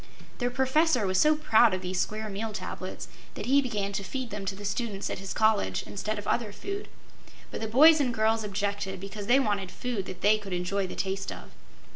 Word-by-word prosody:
The 245 -1 +1
Professor 265 0 +2
was 185 0 +1
so 305 0 +5
proud 235 -8 +4
of 185 - -6
these 180 0 -2
Square 215 0 -3
Meal 210 +2 -4
Tablets 185 -1 -6 0.3
that - - -5
he 275 +3 +4
began 210 -6 -2
to 195 0 -2
feed 250 +4 -5
them 205 -1 -5
to 195 - -1
the 205 +1 -8
students 205 0 -2
at - - -4
his 195 0 -6
college, 215 - +2
instead 210 +2 -4
of 205 - -6
other 230 -4 0
food, 395 - -6 0.6
but - - -5
the 220 - -2
boys 305 +8 +7
and 255 -3 +1
girls 220 0 +1
objected 200 -1 -2
because 200 +1 -7
they 255 +3 +5
wanted 205 -7 0
food 225 -2 -4
that 185 -1 -8
they 215 +1 +4
could 200 -3 -7
enjoy 185 +2 -1
the - - -7
taste 195 0 -2
of. - - -10
210 Hz, 215 wpm, -28 LUFS, 195-240 Hz, 0.6 s, boys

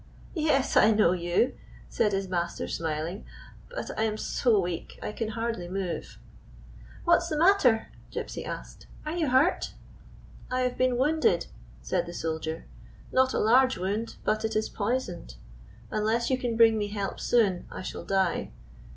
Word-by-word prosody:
" - - -21 0.2
Yes, 275 -2 +2
I 215 - +7
know 215 -5 +4
you," 175 +7 +1 0.3
said 210 - +1
his 195 -1 -1
master, 175 -2 -2
smiling. 160 +4 -3 0.2
" - - -20
But - - -5
I - - +2
am 215 -1 0
so 225 -1 +2
weak 175 -2 -4
I - - -4
can 225 +1 -3
hardly 225 -4 -3
move." 185 -1 -4 0.4
" - - -19
What 345 0 +5
's 340 - -5
the 310 - -1
matter? 310 - +4
" - - -23
Gypsy - - -5
asked. - - -8 0.2
"Are 305 +2 -3
you 320 -5 +1
hurt?" 265 +8 +2 0.7
"I 255 0 0
have 250 -1 0
been 255 -1 +2
wounded," 270 - +2 0.4
said - - -1
the 170 - -7
soldier; 160 0 -3 0.5
"not 260 0 +3
a - - +2
large 255 +4 +4
wound, 205 +5 -2
but 215 0 0
it 220 0 -1
is 215 0 0
poisoned. 205 - -3 0.6
Unless 225 +4 +1
you 260 - +3
can 240 -2 -2
bring 225 -1 +6
me 205 - -1
help 205 -1 -4
soon 205 -7 +2
I - - -7
shall - - -6
die. 190 -3 0
220 Hz, 175 wpm, -28 LUFS, 185-255 Hz, 0.7 s, I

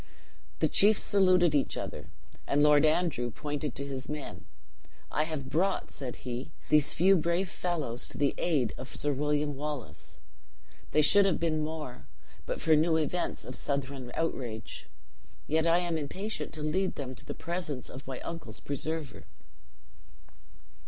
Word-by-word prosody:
The - - +3
chiefs 210 +1 +6
saluted 185 -4 +4
each 145 -2 +1
other; - - -6 0.4
and 145 +1 +3
Lord 150 0 +6
Andrew 155 -7 +1
pointed 145 +3 -4
to 140 - -4
his 135 -2 -5
men: 150 -2 -6 0.7
"I 155 - +1
have 155 -4 -4
brought," 185 +5 +1
said 130 -3 -5
he, 125 +1 -4 0.2
"these 150 -1 +4
few 190 +3 +6
brave 170 +2 +1
fellows 155 -11 -2
to - - -7
the 145 -1 +2
aid 145 -10 +1
of 130 - -7
Sir 145 0 0
William 145 +1 0
Wallace. 145 -3 -6 0.7
They 155 - +3
should 200 +6 +7
have 190 - +1
been 155 -2 +1
more, 150 - -6 0.4
but - - -2
for 160 - +4
new 160 +1 +3
events 160 +3 -1
of 125 - -7
Southron 135 -2 -3
outrage. 125 -9 -3 0.6
Yet 160 +2 +1
I 165 +1 +5
am 175 -2 0
impatient 190 +9 -4
to 155 - -5
lead 185 +5 0
them 130 -2 -5
to - - -15
the - - -6
presence 170 -7 -4
of 130 +1 -10
my 130 -2 -5
uncle's 140 -11 -7
preserver." 150 +1 -4
150 Hz, 155 wpm, -30 LUFS, 135-170 Hz, 0.7 s, should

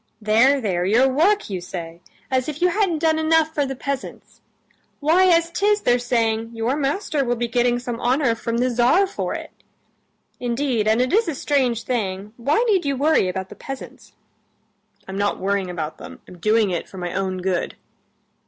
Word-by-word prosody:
"There, 230 +6 +4
there, 185 -7 -1
your 225 +8 +4
work, 345 +11 +2
you 190 -3 -4
say! 170 -1 -7 0.3
As 260 +2 0
if 300 0 -6
you 360 - +3
hadn't 380 -3 +1
done 315 0 +1
enough 315 0 +2
for 290 -3 0
the 270 - -4
peasants! 275 +1 -6 0.6
Why, 330 +6 +4
as 335 -1 +3
'tis, 410 +3 +1
they're 245 0 +2
saying, 230 -1 -1
'Your 230 +4 0
master 295 +1 -1
will 245 -1 0
be 240 0 -2
getting 240 0 +1
some 245 -1 -5
honor 250 0 +2
from 230 0 -3
the 250 +1 +1
Tsar 245 +11 +4
for 390 - -4
it.' - - -7 0.9
Indeed 240 -2 -1
and 220 +3 +3
it 255 - -2
is 440 0 +3
a 320 - -2
strange 255 -5 0
thing; 205 -4 -3
why 265 +5 +1
need 390 -5 +3
you 280 -1 -1
worry 295 -7 +3
about 190 +1 -4
the - - -10
peasants?" 270 -1 -9 0.9
"I'm 190 +1 -5
not 205 0 0
worrying 195 -1 -1
about 160 -3 -5
them; - - -10
I'm 180 - -13
doing 215 +1 +2
it 175 - -3
for 190 - -11
my 175 -1 -4
own 190 -1 -2
good." 180 -1 -2
245 Hz, 190 wpm, -22 LUFS, 210-295 Hz, 0.9 s, There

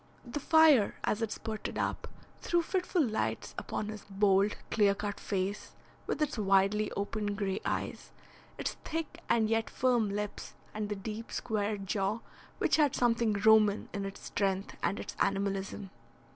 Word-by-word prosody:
The 240 +4 -4
fire, 305 -7 +5
as 215 - 0
it 225 -2 -1
spurted 220 -1 -4
up, - - -2 0.3
threw 345 -1 +2
fitful 360 -3 +1
lights 220 -2 -2
upon 210 - -3
his 215 -1 -7
bold, 195 +1 +3
clear 205 -2 +4
cut 205 0 -4
face, 195 +1 -3 0.3
with 310 - 0
its 295 -6 -2
widely 200 +1 +3
opened 205 0 -2
grey 195 -2 -1
eyes, - - -3 0.5
its - - -2
thick 325 0 -4
and 220 -2 +4
yet 225 0 +1
firm 245 -4 +2
lips, 205 +1 -4 0.2
and 210 -1 -3
the 210 - -1
deep, 215 +3 -6
square 210 -2 -1
jaw, 195 +3 -1 0.4
which - - +2
had 295 -4 +3
something 230 -2 +2
Roman 215 0 +4
in 200 - -2
its 195 0 -7
strength 195 -1 -1
and 200 - 0
its - - -6
animalism. 195 0 -1
210 Hz, 155 wpm, -31 LUFS, 200-230 Hz, 0.5 s, fire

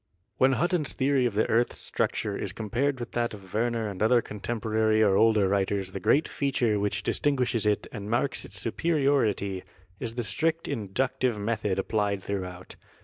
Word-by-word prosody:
When 130 +1 +5
Hutton's 170 0 0
theory 135 -2 +2
of 110 - -5
the 110 - +2
earth's 120 +2 +1
structure 105 -2 -2
is 95 -1 -3
com 110 -1 -6
pared 135 +3 +1
with 120 - -6
that 120 -2 -1
of 95 -2 -14
Werner 115 0 0
and 100 -2 -6
other 120 +3 +5
contemporary 110 0 0
or 100 -2 +4
older 110 -2 +4
writers 95 -1 0
the 95 - -5
great 125 +10 +3
feature 120 -7 0
which 105 +1 -1
distinguishes 125 -6 +1
it 105 -1 +1
and 105 -3 -6
marks 120 +4 0
its 100 - -6
superiority 115 - +1 0.4
is 115 - -4
the 120 - -1
strict 160 +8 0
inductive 125 +3 -1
method 105 -2 -1
applied 100 -1 0
throughout. 90 -2 -5
110 Hz, 170 wpm, -27 LUFS, 100-125 Hz, 0.4 s, When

